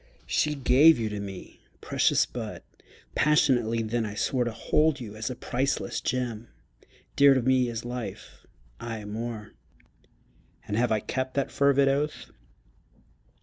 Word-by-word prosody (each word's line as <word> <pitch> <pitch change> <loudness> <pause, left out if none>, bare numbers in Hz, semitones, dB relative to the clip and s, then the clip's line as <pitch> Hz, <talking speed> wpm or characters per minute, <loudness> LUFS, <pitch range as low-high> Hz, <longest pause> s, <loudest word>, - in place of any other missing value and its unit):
She 150 -1 0
gave 140 +4 +5
you 110 -2 -2
to 105 -1 -5
me. 100 -2 -9 0.2
Precious - - +2
bud! - - -7 0.5
Passionately 120 -6 +2
then 115 +1 -1
I 105 -1 -5
swore 125 +3 0
To 120 - -2
hold 150 +6 +1
you 110 -4 -8
as 110 +3 -4
a 125 - -5
priceless 135 +3 -2
gem, 120 -3 -3 0.7
Dear 140 -1 +6
to 130 - +2
me 130 -1 +2
as 115 0 -5
life 120 -1 -7 0.3
aye 115 -3 -6
more! 110 0 -6 1.2
And 105 - -2
have 120 +1 +1
I 110 -1 +1
kept 130 0 -3
that 140 -1 -1
fervid 140 -1 +3
oath? 145 +2 -1
125 Hz, 145 wpm, -27 LUFS, 110-135 Hz, 1.2 s, Dear